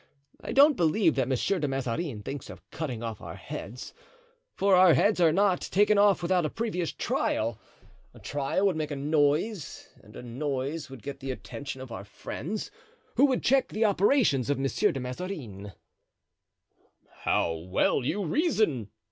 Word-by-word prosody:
I - - -4
don't 285 +2 +6
believe 170 0 +3
that 130 -2 0
Monsieur 135 +9 0
de 150 - 0
Mazarin 135 -2 -3
thinks 140 +6 -6
of - - -12
cutting 125 -8 -4
off 115 -3 -5
our - - -8
heads, 120 +5 -8 0.6
for 185 -4 +5
heads 200 +7 +3
are 165 -2 +6
not 190 +1 +2
taken 205 +1 +3
off 200 -3 +4
without 175 -3 +1
previous 180 -8 -2
trial; 115 0 -1 0.5
a - - -17
trial 145 +7 -1
would 190 -4 +2
make 155 -1 -2
a 145 - -3
noise, 150 +5 0
and - - -16
a - - -8
noise 135 +4 -3
would 135 -3 -11
get 140 -1 -6
the 135 - -6
attention 130 +1 -6
of 130 -2 -9
our 110 -3 -6
friends, 165 - -6 0.4
who - - +5
would 265 -3 0
check 270 +1 +3
the 220 +2 0
operations 200 - +3
of 145 - +1
Monsieur 135 0 +1
de 135 - -4
Mazarin." 125 - -6 1.5
"How 85 - +2
well 90 +10 0
you 190 +10 -1
reason!" 190 - +1
150 Hz, 160 wpm, -28 LUFS, 130-195 Hz, 1.5 s, don't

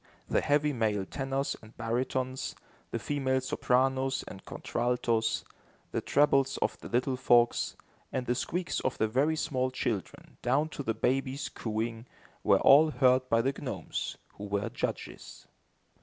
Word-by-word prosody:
The - - +2
heavy 150 +1 +2
male 105 -5 0
tenors 135 +4 -2
and 110 +1 -16
baritones, 130 +3 -2 0.3
the - - -2
female 130 +2 0
sopranos 130 +1 +1
and 95 - -9
contraltos, 120 -2 0 0.5
the - - -1
trebles 135 -2 +3
of - - 0
the - - -9
little 130 +2 +1
folks, 120 -2 +3 0.4
and 130 -1 -2
the 120 - +1
squeaks 170 +7 -2
of 130 - -2
the 110 - +2
very 140 +8 +2
small 130 -5 0
children, 115 -6 -4
down 140 +6 +2
to 145 - -6
the 115 -5 -1
babies' 135 +4 0
cooing, 115 +1 -3 0.4
were - - +5
all 150 +3 +7
heard 130 -3 +3
by 115 0 +3
the 135 - +2
gnomes, - - -4 0.2
who 105 - -5
were 100 0 -1
judges. - - -5
130 Hz, 145 wpm, -30 LUFS, 115-135 Hz, 0.5 s, all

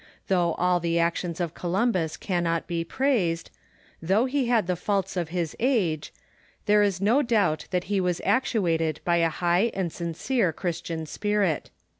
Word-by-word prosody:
Though 175 -3 +2
all 180 0 +2
the 170 0 0
actions 170 0 0
of 170 -2 -2
Columbus 180 -2 0
cannot 170 -3 -1
be 170 -1 -2
praised, 180 -6 0 0.5
though 195 +8 +2
he 265 -1 0
had 235 -4 +3
the 180 +1 0
faults 195 +1 -1
of 175 -3 -2
his 170 -2 -2
age, 195 - 0 0.5
there 210 0 +4
is 200 -3 +1
no 220 +9 +3
doubt 205 - +1
that 180 -1 0
he 200 +1 0
was 180 -1 0
actuated 170 - +1
by 175 -1 +3
a 165 -1 +3
high 175 +7 +1
and 180 -4 -2
sincere 170 +5 -1
Christian 165 -2 -4
spirit. 200 0 -1
180 Hz, 160 wpm, -26 LUFS, 170-205 Hz, 0.5 s, there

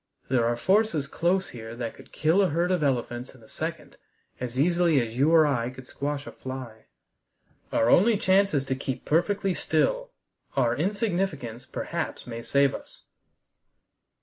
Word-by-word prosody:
There 125 -3 +3
are 120 0 0
forces 190 - +2
close 175 +6 0
here 115 -1 -8
that 120 -1 -4
could - - -16
kill 160 +6 +3
a 190 - +3
herd 170 +4 +1
of 180 -3 +1
elephants 125 -2 -1
in 120 - -18
a - - -16
second - - -6 0.4
as 125 0 -4
easily 170 -1 +3
as 115 -2 -3
you 140 +5 +3
or 165 -1 +6
I 125 -5 0
could 130 0 -11
squash 145 +2 -4
a - - -7
fly. 130 -4 -8 0.9
Our 115 - +2
only 210 - +5
chance 195 -2 +3
is 135 -1 +1
to 130 - -1
keep 130 -1 -5
perfectly 195 +4 +1
still. - - 0 0.5
Our 120 -3 +3
insignificance 175 - -2
perhaps - - -4
may 115 -1 -6
save 140 +3 +2
us." - - -9
140 Hz, 165 wpm, -26 LUFS, 125-180 Hz, 0.9 s, or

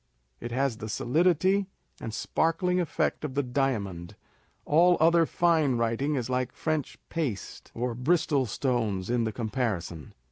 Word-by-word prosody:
It 120 - -6
has 130 -1 0
the 110 - -6
solidity, 180 - +2 0.3
and 115 - -5
sparkling 165 - 0
effect 170 -3 -1
of 140 -3 -4
the 145 - +1
diamond: 105 -9 -2 0.5
all 175 +4 +5
other 165 0 +4
fine 160 -6 +2
writing 115 +6 0
is 125 -4 -2
like 125 -1 -1
French 155 -3 -2
paste 135 - -4
or 120 +1 -2
Bristol 140 +1 +1
stones 110 -5 -1
in 120 -2 +1
the 110 - -1
comparison. 110 - -3
130 Hz, 140 wpm, -28 LUFS, 115-160 Hz, 0.5 s, all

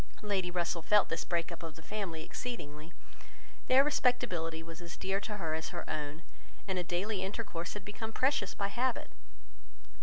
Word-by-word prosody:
Lady 195 -4 +1
Russell 175 -1 0
felt 210 +5 +5
this 165 - 0
break 170 0 0
up 170 - -6
of 165 -2 -6
the 160 - -12
family 180 -5 -3
exceedingly. 155 -9 -5 0.8
Their 260 +2 +8
respectability 215 - +2
was 165 +1 -8
as 170 -1 -7
dear 195 +1 +1
to 210 0 -4
her 165 -5 -1
as 160 0 -1
her - - -5
own, 150 +2 -3 0.4
and 190 -2 +1
a - - 0
daily 185 +4 0
intercourse 190 -3 -3
had 205 -3 -6
become 220 +2 -4
precious 255 -5 +2
by 200 0 0
habit. 245 +3 0
180 Hz, 175 wpm, -34 LUFS, 165-210 Hz, 0.8 s, Their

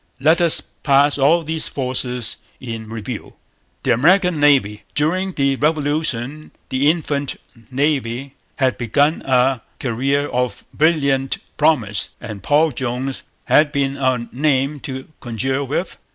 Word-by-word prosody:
Let 160 +5 +4
us 170 -2 +4
pass 140 0 +2
all 160 +5 +4
these 160 0 -1
forces 125 -3 -1 0.2
in 115 -3 -6
review. 115 +1 -6 0.5
The 125 - +3
American 175 +6 +3
Navy. 130 -8 +3
During 185 +6 0
the 140 -2 +1
Revolution 150 -2 -1 0.2
the 135 +3 +2
infant 145 -4 -1 0.3
Navy 135 -1 -1 0.2
had 130 -3 0
begun 145 +7 +1
a 130 -1 +2 0.2
career 135 +3 0
of 125 -4 -2
brilliant 140 -4 +2 0.2
promise; 125 -10 +1
and 105 -3 -8
Paul 150 - +3
Jones 130 +1 -3 0.2
had 150 -1 +4
been 140 -2 0
a 130 -3 0
name 140 +1 +1
to 130 -1 -7
conjure 130 +3 -1
with. 145 +7 -3
135 Hz, 125 wpm, -20 LUFS, 125-150 Hz, 0.5 s, Let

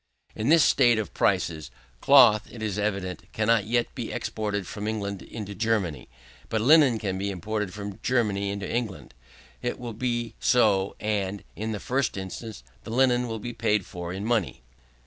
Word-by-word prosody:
In 110 +5 -1
this 165 -1 +7
state 120 -4 +4
of 110 -3 -3
prices, 80 -2 0 0.3
cloth, 105 0 +6
it 115 -2 -8
is 105 -1 -2
evident, 100 -3 -3
cannot 110 -1 +2
yet 120 +1 0
be 120 -4 -5
exported 105 -3 -3
from 105 +4 -5
England 100 -3 -3
into 105 -3 -7
Germany. 100 - -1 0.4
But 110 - 0
linen 140 -1 +6
can 95 -4 -3
be 100 +1 -1
imported 105 +2 -3
from 100 0 -7
Germany 105 -6 +1
into 100 0 -4
England. 95 - -4 0.5
It 120 - -2
will 120 -2 -6
be 120 0 -2
so, 105 -6 +3
and, 100 -2 -2
in 110 +2 -3
the 105 - -3
first 125 -2 -1
instance, 95 - -7 0.2
the - - -9
linen 125 0 +2
will 115 -1 -4
be 120 +3 -6
paid 105 -5 +1
for 85 -1 -6
in 95 +3 -4
money. 110 - -1
105 Hz, 170 wpm, -26 LUFS, 100-115 Hz, 0.5 s, this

